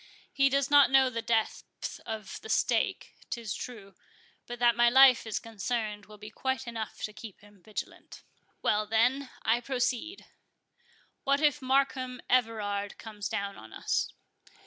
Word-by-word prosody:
He 275 0 +4
does 275 0 +1
not 285 -2 +7
know 265 -1 +5
the 230 -1 -3
depth 225 -1 -2
of 220 -3 -6
the 440 - -10
stake, - - 0 0.2
'tis 230 -4 -4
true, 205 -6 -8 0.5
but 240 - -6
that 240 -1 +4
my 240 0 +5
life 260 -2 +7
is 220 - -2
concerned 215 -1 -4
will 210 0 -13
be 210 +1 -10
quite 265 +2 -2
enough 225 -2 -6
to 215 - -3
keep 215 -2 -11
him 205 -2 -19
vigilant.—Well, 210 0 -5
then, 250 +5 +2
I 235 +2 +2
proceed:—What 275 +1 -4
if 295 -1 +2
Markham 260 -1 0
Everard 210 -5 0
comes 210 -3 -6
down 200 0 -3
on 110 0 -13
us?" - - -1
235 Hz, 145 wpm, -29 LUFS, 210-265 Hz, 0.5 s, not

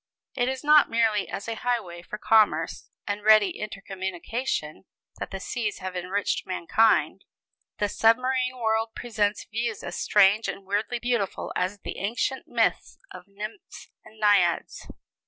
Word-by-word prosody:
It 245 -1 +1
is 265 +1 -4
not 300 0 +6
merely 225 -3 +1
as 200 - -6
a 230 - -2
highway 210 -9 -2
for 210 - -7
commerce 210 -8 +2 0.2
and 205 0 -3
ready 215 -3 +6
intercommunication 195 -2 -4 0.3
that - - -4
the 195 - -6
seas 210 +1 -3
have 185 0 -6
enriched 185 +3 -2
mankind. 190 +5 +2 0.5
The 205 - +1
submarine 255 +4 +2
world 225 -1 0
presents 215 -3 -1
views 225 0 -3
as 175 - -5
strange 205 +2 +4
and 195 - -5
weirdly 205 +5 -1
beautiful 235 -5 -2
as 185 +2 -2
the - - -6
ancient 235 +6 -2
myths - - 0
of - - -10
nymphs 210 - -9
and 220 - -17
naiads. 200 -5 +2
210 Hz, 140 wpm, -26 LUFS, 195-230 Hz, 0.5 s, not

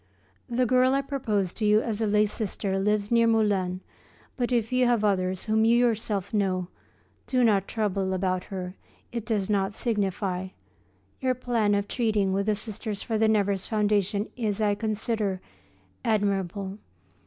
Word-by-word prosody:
The 245 +1 +1
girl 255 +2 +4
I 275 - +1
proposed 215 -10 -2
to 220 - -1
you 210 +1 +5
as 225 -1 -2
a 220 - +2
lay 210 +1 +4
sister 200 -2 -2
lives 210 +1 0
near 230 -1 +4
Moulins, 200 -5 +1 0.5
but 245 -1 -1
if 235 -2 +1
you 250 -1 +3
have 235 -3 +2
others 185 -2 +1
whom 220 0 +2
you 230 +1 +5
yourself 220 -5 0
know, 185 -3 0 0.6
do 255 -1 +2
not 200 -4 +3
trouble 200 -4 -1
about 185 -1 -1
her, 185 -2 -5 0.4
it 235 -2 -5
does 205 -4 0
not 200 -1 0
signify. 195 -4 -1 0.7
Your 255 -1 +1
plan 230 -4 +1
of 200 0 -1
treating 210 -6 +1
with 200 +2 0
the 215 - +3
Sisters 215 0 -5
for 220 -2 -1
the 220 - +4
Nevers 200 -3 +1
foundation 210 -1 +1
is, 220 -4 -2
I 210 -1 +2
consider, 215 -2 -1 0.6
admirable. 200 -2 -1
210 Hz, 160 wpm, -26 LUFS, 195-225 Hz, 0.7 s, you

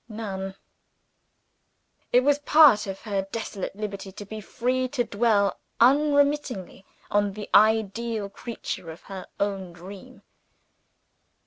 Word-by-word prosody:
None! 195 -3 -5 1.6
It 245 - +6
was 290 +1 +3
part 295 -8 +6
of 195 0 -6
her 195 -3 -2
desolate 210 -4 -5
liberty 200 -2 -6
to 205 - -9
be 215 +2 -7
free 255 +5 -1
to 250 -1 -1
dwell 205 -3 +1 0.2
unremittingly 285 -6 +2 0.2
on 205 -1 +2
the 210 +1 -7
ideal 220 0 +3
creature 200 -4 -6
of 160 - -10
her 190 -2 -8
own 195 -3 -2
dream. 185 +3 -12
210 Hz, 115 wpm, -25 LUFS, 195-240 Hz, 1.6 s, It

